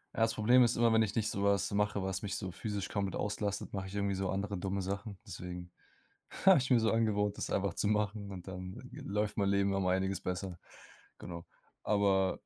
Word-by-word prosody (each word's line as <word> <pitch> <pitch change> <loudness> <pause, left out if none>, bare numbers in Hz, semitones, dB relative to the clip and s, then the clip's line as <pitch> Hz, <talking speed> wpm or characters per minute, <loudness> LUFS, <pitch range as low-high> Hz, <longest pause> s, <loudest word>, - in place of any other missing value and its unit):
Ja, - - -3
das 115 0 +3
Problem 120 +4 +6
ist 120 -1 +3
immer, 115 -1 +4
wenn 110 - +5
ich 105 -2 0
nicht 110 -2 +1
so 100 - -2
was 100 -2 +2
mache, 105 -1 +1
was 95 -1 -2
mich 100 -1 -3
so 95 -3 -4
physisch 100 +2 -4
komplett 100 -2 -2
auslastet, 105 -1 -2
mache 95 -1 -3
ich 100 - -8
irgendwie 100 -1 0
so 95 0 -1
andere 100 0 -2
dumme 95 +1 -2
Sachen, 100 +1 -4
deswegen 90 -3 -7 0.8
habe 190 - +10
ich 130 0 0
mir 120 - +6
so 110 -1 +2
angewöhnt, 105 -2 +1
das - - -3
einfach 100 -3 0
zu 105 - 0
machen, 105 -1 0
und 90 -1 -8
dann 95 0 -6 0.2
g - - -9
läuft 105 +1 -1
mein 100 -1 +2
Leben 100 0 +2
um 95 -1 0
einiges 95 0 +1
besser. 90 -1 -4 0.6
Genau, 85 -1 -7 0.4
aber 95 -2 +2
100 Hz, 215 wpm, -33 LUFS, 95-105 Hz, 0.8 s, habe